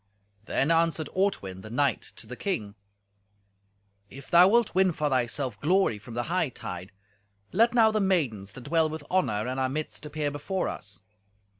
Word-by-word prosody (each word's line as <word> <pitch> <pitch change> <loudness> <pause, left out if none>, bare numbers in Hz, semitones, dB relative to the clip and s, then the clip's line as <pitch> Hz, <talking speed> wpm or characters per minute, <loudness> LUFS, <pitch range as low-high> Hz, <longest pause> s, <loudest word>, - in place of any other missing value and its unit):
Then 135 +7 +1
answered 165 -2 +2
Ortwin, 100 - -1
the 110 - -10
knight, 135 +2 +1
to - - -7
the 125 +3 -7
king, 110 - -3 1.4
"If 135 +3 -12
thou 175 +2 +8
wilt 235 +2 +3
win 190 -1 +3
for 150 -1 -1
thyself 125 -2 -1
glory 175 - +2
from 115 +3 -10
the 120 - -1
hightide, 125 - -3 0.6
let 230 +2 +3
now 225 -2 +6
the 215 -1 +1
maidens 130 - 0
that 130 - -9
dwell 160 +3 +2
with 155 -1 -6
honour 115 - +1
in 130 +1 -3
our 130 0 +1
midst 155 +2 -4
appear 150 -1 -2
before 180 +6 -2
us. 100 -1 -6
145 Hz, 165 wpm, -27 LUFS, 120-185 Hz, 1.4 s, thou